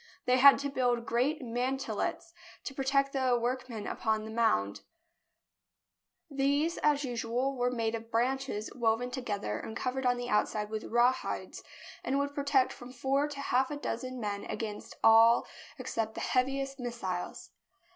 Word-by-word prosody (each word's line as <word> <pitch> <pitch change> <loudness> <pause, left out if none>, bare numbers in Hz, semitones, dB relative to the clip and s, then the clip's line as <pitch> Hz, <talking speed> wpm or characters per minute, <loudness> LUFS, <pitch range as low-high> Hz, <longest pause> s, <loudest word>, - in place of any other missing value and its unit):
They 250 0 +4
had 280 +1 +9
to 280 0 -3
build 245 -3 +1
great 260 +6 0
man 250 +3 -1
telets 300 +8 -3 0.3
to 270 - -5
protect 275 +1 +1
the 260 -3 +2
workmen 240 -2 -3
upon 220 -1 -1
the 220 - -7
mound. 100 - +1 1.5
JERUSALEM 280 - -10
These, 285 +5 +2
as 295 -1 +2
usual, 245 +2 -1
were 245 -1 +1
made 230 -2 -1
of 230 0 -5
branches 245 -1 -1
woven 240 +1 0
to 260 +1 -4
gether 200 - -3
and 220 - -6
covered 255 +1 -1
on 245 0 +2
the 245 0 -4
outside 210 -1 0
with 220 0 -4
rawhides, 240 +2 0 0.4
and 270 - 0
would 285 0 -1
protect 280 -2 +2
from 245 +1 -11
four 270 +3 0
to 290 -1 -8
half 260 -1 +1
a 295 - -4
dozen 255 -1 -4
men 205 -2 -3
'against 210 -2 -5
all 225 +1 +7 0.3
except 230 -4 -3
the - - -4
heaviest 270 +2 0
missiles. 235 -8 -4
250 Hz, 160 wpm, -31 LUFS, 225-270 Hz, 1.5 s, had